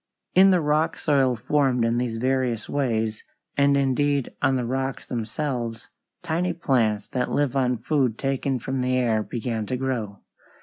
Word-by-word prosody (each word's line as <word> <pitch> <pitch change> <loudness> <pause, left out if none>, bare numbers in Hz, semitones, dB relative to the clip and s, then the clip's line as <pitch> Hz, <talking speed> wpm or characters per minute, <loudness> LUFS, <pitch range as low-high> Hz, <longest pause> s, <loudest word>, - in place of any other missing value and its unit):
In 190 +1 +7
the 180 -2 +4
rock 150 +1 +1
soil 135 -4 +2
formed 125 0 +1
in 115 +1 +1
these 120 -2 -2
various 125 -2 0
ways, 115 -6 -1 0.3
and 140 0 +4
indeed 140 0 +1
on 135 -1 +3
the 125 -2 -1
rocks 130 +2 -2
themselves, 120 -1 -4 0.3
tiny 175 +1 0
plants 115 -10 +1
that 125 -1 -1
live 145 -2 0
on 125 -2 +1
food 125 -1 0
taken 135 -1 -1
from 130 +2 -3
the 130 0 +1
air 115 -4 +2
began 110 -1 -3
to 130 - -2
grow. 120 -6 -3
130 Hz, 160 wpm, -24 LUFS, 115-140 Hz, 0.3 s, In